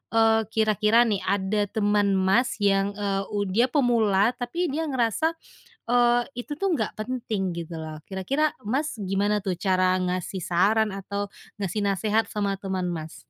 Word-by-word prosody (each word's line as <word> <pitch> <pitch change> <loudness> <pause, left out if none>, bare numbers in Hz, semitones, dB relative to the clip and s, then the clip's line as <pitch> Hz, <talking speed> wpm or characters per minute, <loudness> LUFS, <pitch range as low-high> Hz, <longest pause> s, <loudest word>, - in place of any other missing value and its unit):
eee, 225 -1 +4
kira-kira 220 +1 +3
nih 210 -4 0
ada 200 +2 0
teman 205 -1 +1
Mas 190 +6 +2
yang, 200 0 +2
eee, 200 -1 -2
u 205 - +1
dia 215 +6 +2
pemula 230 -6 +3
tapi 270 +7 -3
dia 320 +2 -2
ngerasa, 265 +5 0 0.5
eee, 240 0 +4 0.2
itu 295 0 -7
tuh 390 -3 +1
nggak 220 -6 -1
penting 215 -6 -3
gitu 165 -1 -6
loh 155 -1 -8
kira-kira 275 +11 -1 0.2
Mas 270 -1 -1
gimana 200 +2 0
tuh 190 -3 -2
cara 185 0 +2
ngasih 185 0 -2
saran 205 +5 +2
atau 200 +1 -4 0.2
ngasih 200 0 -3
nasehat 215 +3 +1
sama 200 -2 -2
teman, 185 -2 -2
Mas? 160 -1 -6
205 Hz, 155 wpm, -25 LUFS, 190-230 Hz, 0.5 s, eee